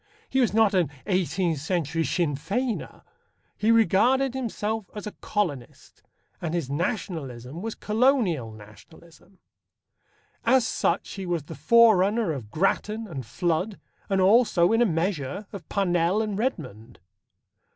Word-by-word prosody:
He 265 - 0
was 240 - +2
not 215 -1 +3
an 180 -4 +2 0.2
eighteenth 180 -4 0
century 165 0 -1
Sinn 160 -4 0
Feiner. 225 - -3 0.5
He 215 - 0
regarded 235 +5 +3
himself 220 -5 -3
as 210 - -6
a 210 - -5
colonist, 160 - -4 0.4
and 170 -1 -2
his 150 -6 -3
Nationalism 155 - -4
was 225 +1 -4
Colonial 210 - +1
Nationalism. 160 - -16 1.1
As 260 -3 +4
such 170 - 0
he 195 -2 -6
was 170 -4 -1
the - - -9
forerunner 215 +2 +4
of 125 -8 -6
Grattan 210 - 0
and 140 -8 -6
Flood, 175 - -2 0.3
and 195 -1 +1
also, 190 -3 +4
in 225 +1 +3
a 240 - +4
measure, 165 0 -2
of 185 -6 -9
Parnell 180 +1 +1
and 210 -2 -3
Redmond. 120 - -4
185 Hz, 130 wpm, -25 LUFS, 160-220 Hz, 1.1 s, As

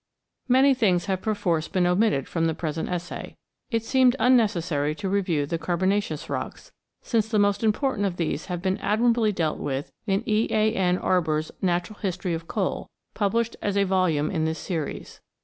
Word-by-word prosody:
Many 265 +2 +5
things 195 -9 +2
have 190 -2 -1
perforce 175 -7 0
been 185 -3 +1
omitted 180 - +2
from 165 -1 -1
the 160 - -1
present 160 -1 -3
essay. 180 0 -5 0.3
It 230 -3 0
seemed 255 0 +4
unnecessary 175 - +2
to 195 - -4
review 180 -7 0
the 165 +3 -3
Carbonaceous 185 -2 -1
rocks, - - -5 0.3
since 225 -3 +1
the 220 -1 0
most 205 +1 +2
important 220 -1 +1
of 180 -2 -5
these 160 -2 -2
have 180 -2 -4
been 190 0 0
admirably 225 +1 +2
dealt 165 -6 -1
with 135 0 -3 0.2
in 195 +2 +1
E. 215 +1 +2
A. 220 0 +2
N. 180 -3 +1
Arber's 160 -5 0
Natural 180 +3 -1
History 185 -3 -2
of 165 0 -5
Coal, - - -2 0.2
published 230 +3 0
as 205 -1 -1
a 200 - +4
volume 185 -6 +1
in 160 -4 0
this 160 0 -1
series. 165 -6 -5
185 Hz, 175 wpm, -25 LUFS, 165-215 Hz, 0.3 s, Many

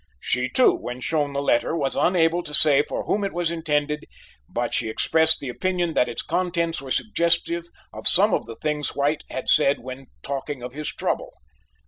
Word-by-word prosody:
She, 125 - -1
too, 255 - +4
when 125 +1 -6
shown 145 +1 -1
the 140 0 -2
letter, 140 +5 +1
was 135 -4 -1
unable 175 -1 +2
to 150 -3 -2
say 145 -2 +5
for - - -4
whom 205 - -1
it 195 - -2
was 175 -1 -1
intended, 150 -2 -1 0.4
but - - -2
she 110 - 0
expressed 160 +7 +2
the 135 - -6
opinion 175 +4 -1
that 125 - +2
its 120 - -4
contents 170 -3 -1
were 135 - -9
suggestive 170 -1 0 0.3
of - - -6
some 200 +2 +6
of - - -1
the 115 - -8
things 150 +1 -3
White 145 +2 0
had 130 - -5
said 145 -2 +4
when 130 +2 -9 0.2
talking 140 -1 -5
of 125 0 -7
his 150 +1 -5
trouble. - - -2
150 Hz, 190 wpm, -23 LUFS, 135-170 Hz, 0.4 s, some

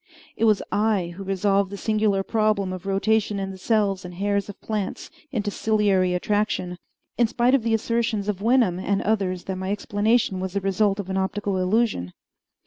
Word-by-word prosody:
It 225 - +1
was 215 -2 +3
I 205 -5 +1
who 195 - -7
resolved 195 0 +1
the 200 - -6
singular 210 -2 +1
problem 215 -3 +1
of 185 +1 -7
rotation 210 +1 +1
in 195 0 -3
the 190 - -9
cells 200 -2 +1
and 180 -1 -8
hairs 200 +2 -1
of 200 - -9
plants 210 -3 -4 0.2
into 210 -6 -2
ciliary 200 -4 +2
attraction, 185 -2 -1 0.4
in 235 - +5
spite 240 +2 +2
of 275 - +4
the 225 0 +1
assertions 225 -2 -1
of 200 -2 -2
Wenham 225 -6 +3
and 195 +1 0
others 190 -4 0
that 190 -1 -4
my 190 0 -4
explanation 205 0 +1
was 185 0 -4
the 200 - -1
result 195 +1 +1
of 190 -1 -4
an 190 - -1
optical 200 +1 -1
illusion. 185 - 0
200 Hz, 185 wpm, -24 LUFS, 190-215 Hz, 0.4 s, in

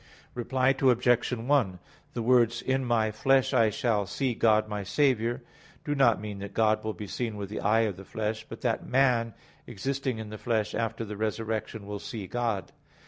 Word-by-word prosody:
Reply 130 +2 +1
Obj. 125 -3 +3
1: 120 -6 +1 0.4
The 120 - -1
words, 120 -1 +3
"In 130 0 0
my 115 -3 +1
flesh 135 +4 +2
I 110 -1 +4
shall 105 -2 0
see 130 +2 -1
God 110 -1 +3
my 105 -1 -3
Saviour," 120 +1 +1 0.4
do 145 - 0
not 135 -6 +4
mean 105 -1 -6
that 100 0 -8
God 110 -1 +2
will 110 0 -2
be 105 - -6
seen 110 +2 -4
with 100 -1 -5
the 105 - -4
eye 110 +3 +3
of 105 -5 -1
the 95 - -9
flesh, 110 +2 -3
but 115 - -8
that 115 -3 0
man 125 -4 +2 0.3
existing 135 +3 -2
in 110 -1 -7
the 110 - -7
flesh 110 -3 -1
after 115 0 -2
the 105 -1 -7
resurrection 110 0 -3
will 100 0 -5
see 105 -1 -6
God. 115 -4 -2
115 Hz, 190 wpm, -28 LUFS, 105-125 Hz, 0.4 s, I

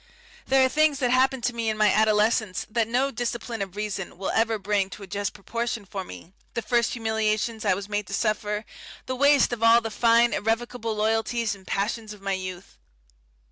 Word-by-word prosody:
There 265 0 +5
are - - +4
things 305 +1 +2
that 250 -2 0
happened 260 0 +2
to 245 - 0
me 230 -1 -1
in 215 - -2
my 210 -1 +4
adolescence 215 -1 +2
that 225 -1 +1
no 255 +4 +1
discipline 235 -1 -4
of 190 -1 -5
reason 205 -4 -4
will 190 - -2
ever 225 0 +1
bring 200 -1 0
to 200 - -10
a - - -6
just 200 +2 -3
proportion 230 +1 -4
for 195 0 -5
me, 165 - -12 0.2
the 235 - -2
first 235 -2 +1
humiliations 220 -1 -1
I 190 -2 +3
was 200 +1 -6
made 205 -2 -2
to - - -7
suffer, 210 0 -1 0.4
the 255 - -3
waste 280 -1 +4
of 235 - -5
all 230 +1 +7
the 225 -1 -5
fine 235 +1 +4
irrecoverable 225 0 -1
loyalties 225 +1 0
and 195 -2 -14
passions 215 +2 -2
of 205 - -15
my 195 0 -1
youth. 185 -1 -7
220 Hz, 200 wpm, -25 LUFS, 205-235 Hz, 0.4 s, all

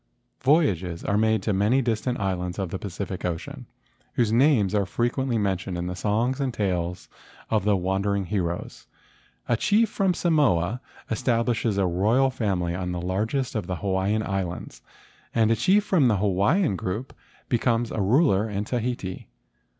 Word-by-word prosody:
Voyages 100 - +2
are 100 - 0
made 110 +1 +2
to 105 - 0
many 105 +7 +3
distant 120 0 -1
islands 90 -2 -2
of 95 -4 -3
the 95 - -3
Pacific 95 -1 -5
Ocean, 85 -3 -5 0.5
whose 115 -3 +1
names 115 -5 +3
are 100 -3 +1
frequently 120 +3 0
men¬ 100 -3 +1
tioned 90 0 -5
in 85 - -3
the 90 0 -4
songs 115 +8 0
and 135 -2 0
tales 90 -5 -2 0.4
of 105 -3 +1
the 105 -1 +4
wandering 95 +2 0
heroes. 90 -3 -3 0.6
A 120 - +2
chief 210 - +2
from 190 -3 +1
Samoa 125 - +2 0.3
establishes 115 -2 0
a 100 - +2
royal 110 +10 +2
family 95 -8 -1
on 90 0 -3
the 90 - -3
largest 110 +9 -1
of 105 -6 -3
the 90 - -2
Hawaiian 95 +4 0
Islands, 95 -5 -4 0.5
and 115 -1 +3
a - - +4
chief 190 - +3
from 175 -10 +3
the 110 -4 +3
Hawaiian 100 - +2
group 95 +8 -4 0.3
becomes 120 -1 +1
a 110 - -2
ruler 110 - +3
in 100 0 -2
Tahiti. 120 -6 -3
105 Hz, 160 wpm, -25 LUFS, 95-120 Hz, 0.6 s, the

